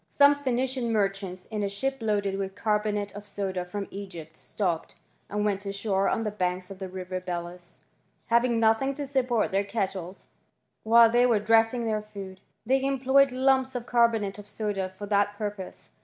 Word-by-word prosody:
Some 285 0 +6
Phoenician 260 -3 -1
merchants, 195 -3 -1
a 210 -2 -1
ship 270 +7 -2
loaded 200 -3 0
with 195 -1 -4
carbonate 210 -2 -1
of 205 0 -8
soda 195 -3 -3
from 195 +3 -5
Egypt, 175 -5 -8
pped, 175 -1 -3 0.3
and 210 +1 -1
went 200 -1 0
ashore 195 -1 0
on 225 - 0
the 210 - -2
banks 185 -2 -2
of 190 - -9
the 190 -1 -5
river 185 0 -5
us: 175 0 -6 0.4
having 235 0 +3
nothing 225 +5 +3
to 290 0 -3
support 255 -5 +1
their 195 +1 +2
kettles 195 -3 -4 0.6
while 230 +1 +6
y 245 +1 +5
were 235 -3 +4
dressing 225 +3 +3
their 215 -1 0
food, 200 -3 -9 0.2
they 265 +3 +2
employed 270 0 +3
lumps 260 0 +2
of 240 -1 -3
bonate 225 -5 +2
of 205 - -10
soda 205 -3 -2
for 190 +2 -8
that 205 0 +1
purpose. 205 -3 -6
210 Hz, 170 wpm, -27 LUFS, 195-235 Hz, 0.6 s, Some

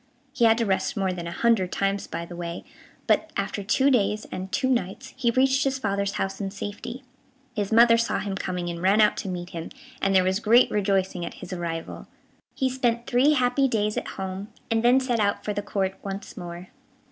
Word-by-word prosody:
He 255 -4 +3
had 225 0 +5
to 230 - +1
rest 195 +2 0
more 190 -2 0
than 170 -1 -5
a - - -4
hundred 195 -2 +2
times 195 0 -1
by 170 - -5
the 175 - -9
way, 170 0 -5 0.4
but, 320 - +2
after 200 +1 -2
two 265 +8 +3
days 210 -3 +1
and 185 +1 -5
two 260 - +1
nights, 250 +1 -2
he 255 -2 +1
reached 265 +3 +3
his 270 -1 0
father's 200 -4 -1
house 195 +2 -3
in 195 - -2
safety. 205 +6 -7 0.5
His 205 -2 -2
mother 230 +1 +6
saw 230 - 0
him 200 -1 -3
coming, 180 -2 -3
and 170 -1 -4
ran 195 +3 +4
out 210 - +5
to 205 - -4
meet 175 -1 -5
him, 165 -1 -6 0.3
and 195 0 +2
there 185 - +6
was 190 +2 +1
great 230 +3 +5
rejoicing 190 -3 0
at - - -6
his 185 - -8
arrival. 170 -2 -5 0.5
He 265 - +1
spent 240 -2 0
three 260 +5 +4
happy 255 0 +2
days 210 -3 0
at - - -3
home, 190 +1 -4 0.2
and 225 0 +2
then 245 +3 +5
set 250 -3 0
out 200 -1 0
for 210 - -1
the 205 - -2
Court 195 -2 -1
once 195 0 -6
more. 175 0 -8
205 Hz, 215 wpm, -25 LUFS, 190-235 Hz, 0.5 s, mother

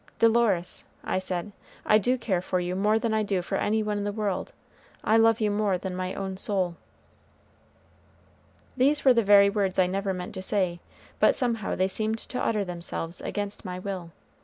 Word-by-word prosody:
"Dolores," 225 -6 +2 0.2
I - - -1
said, 185 +1 -3 0.3
"I 215 - +5
do 250 +5 +1
care 195 -7 -1
for 185 0 -1
you 180 +1 -2
more 210 +3 +2
than 225 0 -1
I 220 - +2
do 195 -4 -1
for - - -2
any 220 +1 +1
one 210 -1 -1
in - - -2
the 205 - -1
world; 205 -3 -2 0.5
I 220 - +3
love 225 0 +5
you 210 -2 +1
more 205 -2 +1
than 185 0 -5
my 185 0 -3
own 190 -1 -4
soul." 185 -3 0 2.0
These 280 +3 +2
were 260 - +8
the 235 - +3
very 200 -1 +6
words 200 -3 0
I 185 - +5
never 195 +2 -1
meant 180 -1 -5
to 190 - -5
say, 185 -3 0 0.4
but - - +5
somehow 235 -6 -1
they 185 - +2
seemed 215 +3 -1
to 250 - -5
utter 210 -3 0
themselves 170 -1 -4
against 205 0 -4
my 180 -3 -5
will. 185 -2 -5
200 Hz, 190 wpm, -27 LUFS, 185-220 Hz, 2.0 s, were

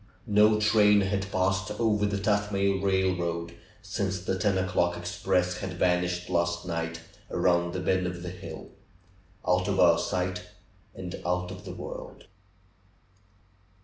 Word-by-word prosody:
No 105 -1 +4
train 105 -1 +5
had 95 0 -1
passed 95 0 0
over 105 -3 +2
the 100 0 -1
Tuthmay 100 -1 +1
railroad 90 -3 0 0.3
since 95 -1 -2
the 95 +1 -2
ten 100 0 +1
o'clock 90 -1 +1
express 90 +1 0
had 95 0 -5
vanished 90 0 +1
last 85 -1 0
night 85 -1 -3 0.3
around 85 -1 +2
the 95 - -3
bend 95 0 +1
of 90 0 -6
the 90 - -5
hill 90 - -9 0.4
— 95 +2 -25
out 90 0 +2
of - - 0
our - - +6
sight, 90 0 -2 0.5
and 90 -1 -7
out 90 +1 -1
of 95 - -9
the - - -7
world - - -8
95 Hz, 145 wpm, -28 LUFS, 90-100 Hz, 0.5 s, our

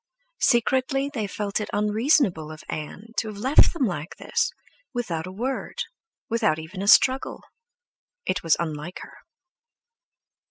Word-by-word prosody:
Secretly 265 +3 +2
they 215 -5 -2
felt 200 +1 -2
it 210 - -4
unreasonable 210 - +2
of 155 - -10
Ann 170 +8 -6
to 225 - +1
have 210 -2 -6
left 260 +8 +5
them 310 -7 0
like 175 -5 -4
this - - 0 0.4
without 180 -9 -2
a - - -6
word, 260 - -3 0.4
without 220 -9 +2
even 165 +5 -7
a 200 - -2
struggle. 260 +5 +4 0.8
It 185 - 0
was 165 -2 +3
unlike 160 +1 -4
her. - - -12
210 Hz, 135 wpm, -25 LUFS, 170-250 Hz, 0.8 s, left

